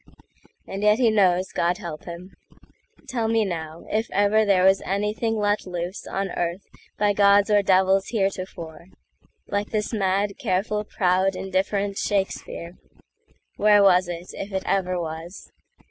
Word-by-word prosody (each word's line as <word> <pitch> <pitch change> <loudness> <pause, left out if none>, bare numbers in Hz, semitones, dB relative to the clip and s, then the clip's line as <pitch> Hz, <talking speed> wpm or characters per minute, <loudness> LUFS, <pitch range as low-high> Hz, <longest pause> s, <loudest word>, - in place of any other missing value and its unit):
And 195 +1 -6
yet 210 +1 +4
he 235 -3 +3
knows, 185 -3 +2
God 175 +1 0
help 170 -6 -8
him! 175 +2 -9 0.8
Tell 230 -3 -1
me, 225 -1 +2
now, 160 -3 -5
If 220 +2 -1
ever 205 +2 +3
there 195 -3 +3
was 190 +1 +4
anything 210 +3 -1
let 205 -1 +1
looseOn 185 +2 -5
earth 175 +2 -3 0.3
by 205 0 +2
gods 200 +1 +4
or 205 -1 +5
devils 190 0 +3
heretoforeLike 190 0 -5
this 215 +1 -2
mad, 200 +1 0
careful, 210 -2 -1
proud, 185 0 +1
indifferent 195 +1 -1
Shakespeare! 190 -3 -3 0.8
Where 205 -1 +5
was 185 -2 +5
it, 175 0 -7
if 200 - -6
it 190 -1 -2
ever 185 -2 0
was? 165 +2 -7
195 Hz, 135 wpm, -24 LUFS, 180-205 Hz, 0.8 s, or